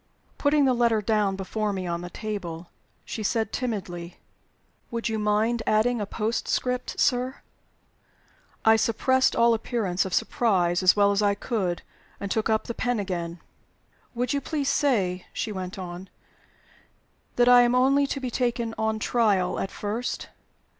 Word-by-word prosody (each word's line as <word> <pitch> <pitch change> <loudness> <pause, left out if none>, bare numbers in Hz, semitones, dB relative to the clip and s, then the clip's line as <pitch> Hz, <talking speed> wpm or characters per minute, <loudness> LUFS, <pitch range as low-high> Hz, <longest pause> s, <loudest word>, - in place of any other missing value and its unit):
Putting 290 0 +3
the 260 - +4
letter 235 -2 +2
down 210 -2 +1
before 210 +2 -2
me 190 -2 -3
on 170 -1 -2
the 175 - -7
table, 180 -5 -6 0.3
she 220 - -5
said, 220 +1 0
timidly: 185 -8 -4 0.7
"Would 230 -1 -2
you 220 -1 -1
mind 215 +3 +1
adding 225 +2 +2
a 205 - -3
postscript, 235 +3 -2
sir?" 255 +1 +1 1.2
I 220 0 +7
suppressed 260 +4 +2
all 235 0 +5
appearance 220 -5 -1
of 190 -2 -2
surprise 180 -7 +1
as 185 -1 +5
well 200 -1 +4
as 200 +1 +1
I 205 -1 +2
could, 190 -7 -2 0.4
and 200 -1 -5
took 220 0 0
up 220 0 +2
the 235 - -5
pen 245 -1 -1
again. 175 -3 -4 0.7
"Would 245 +2 -1
you 280 - 0
please 290 -3 -2
say," 195 -11 +1
she 220 - -3
went 185 -1 -5
on, 180 0 -7 1.3
"that 245 0 +4
I 245 0 +8
am 240 0 +3
only 275 +2 +4
to 275 - -3
be 255 -2 -4
taken 235 -2 -1
on 220 0 0
trial, 210 -5 +1
at 195 - -2
first? 215 +6 -4
220 Hz, 155 wpm, -26 LUFS, 190-245 Hz, 1.3 s, I